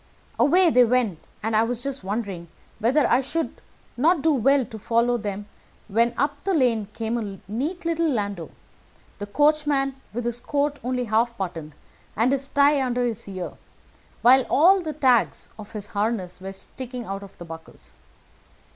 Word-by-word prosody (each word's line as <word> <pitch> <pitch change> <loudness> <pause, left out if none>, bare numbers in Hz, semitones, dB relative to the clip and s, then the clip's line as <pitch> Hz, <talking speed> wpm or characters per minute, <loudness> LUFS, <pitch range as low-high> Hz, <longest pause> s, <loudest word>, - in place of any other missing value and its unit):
"Away 350 +3 +5
they 250 -2 +6
went, 235 -8 +1 0.2
and 220 0 0
I 215 - +5
was 235 +1 -1
just 275 -5 -4
wondering 195 -4 -4 0.3
whether 255 +7 +3
I 245 - +3
should 325 +5 -3 0.3
not 310 +4 +2
do 320 -1 +4
well 270 +1 +3
to 220 0 -9
follow 235 +3 +2
them, 205 -1 -4 0.4
when 235 +3 +2
up 285 0 -1
the 390 -2 +1
lane 235 -7 +2
came 230 +1 -2
a 200 -4 -6
neat 295 - -3
little 335 -1 +1
landau, 200 - -2 0.7
the 205 - -5
coachman 290 +1 +2 0.2
with 240 +2 -4
his 240 0 -1
coat 285 +2 -1
only 250 0 -1
half 235 +1 +1
buttoned, 165 -5 -5 0.4
and 230 +4 +2
his 275 0 -1
tie 285 0 +4
under 250 -1 0
his 230 -2 -3
ear, 185 -2 -5 0.7
while 260 +2 +7
all 370 +7 +5
the 315 -3 -4
tags 255 -5 +2
of 210 +1 -10
his 210 -2 -4
harness 200 -4 -2
were 190 +1 -6
sticking 250 +4 -7
out 195 0 -5
of 200 -1 -13
the 175 - -9
buckles. 165 -1 -11
240 Hz, 170 wpm, -24 LUFS, 210-280 Hz, 0.7 s, while